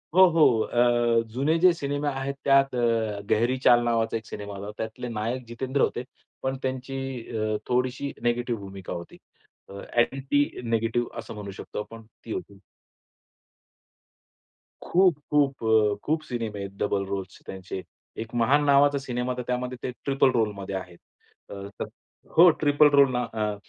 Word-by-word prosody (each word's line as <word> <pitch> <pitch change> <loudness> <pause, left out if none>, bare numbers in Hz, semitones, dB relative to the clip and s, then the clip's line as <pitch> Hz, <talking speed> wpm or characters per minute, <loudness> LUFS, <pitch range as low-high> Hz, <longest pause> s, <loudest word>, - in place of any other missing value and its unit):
हो, 190 0 +9
हो, 155 -9 +4
अ, 120 -1 +2
जुने 140 +6 +1
जे 180 +1 +7
सिनेमा 145 -2 -2
आहेत 135 0 -3
त्यात 135 -1 +4
अ, 115 -4 0
गेहरी 120 +4 +2
चाल 120 -2 +6
नावाचा 115 -1 +1
एक 110 - -10
सिनेमा 105 -1 -7
आला 100 +1 -7
होता. 105 +1 -8
त्यातले 110 +2 -6
नायक 115 +3 -3
जितेंद्र 130 +4 -2
होते, 120 - +1 0.4
पण 130 0 -1
त्यांची 130 +1 -3 0.4
अ, 110 0 0
थोडीशी 130 +3 0
नेगेटिव्ह 120 -2 0
भूमिका 95 -1 -7
होती. 85 -1 -8 0.5
अ, - - -10 0.2
ॲक्टिंग 135 +3 +1
नेगेटिव्ह 115 +1 0
असं - - -7
म्हणू 105 -1 -7
शकतो - - -6
आपण 115 +1 -10 0.2
ती 115 - -7
होती. 100 -1 -7 2.2
खूप, 180 -3 +3
खूप 140 -4 +2
अ, 110 -2 +3
खूप 155 +1 +1
सिनेमे 115 -6 -4
आहेत 100 -1 -5
डबल 100 -1 0
रोल्स 95 -1 -4
चे - - -24
त्यांचे. 95 0 -6 0.4
एक 115 +1 -8
महान 135 +5 +3
नावाचा 140 0 +5
सिनेमा 125 -1 -2
तर - - -2
त्यामध्ये 125 0 -2
ते 125 - -2
ट्रिपल 135 -1 +3
रोल 115 -4 +1
मध्ये 100 0 -5
आहे. 90 -2 -6 0.5
अ 100 0 -7 0.7
हो, 175 +2 +9
ट्रिपल 150 0 +5
रोल 140 -1 +5
ना 125 0 0
अ, 105 -1 -1
120 Hz, 160 wpm, -26 LUFS, 110-135 Hz, 2.2 s, हो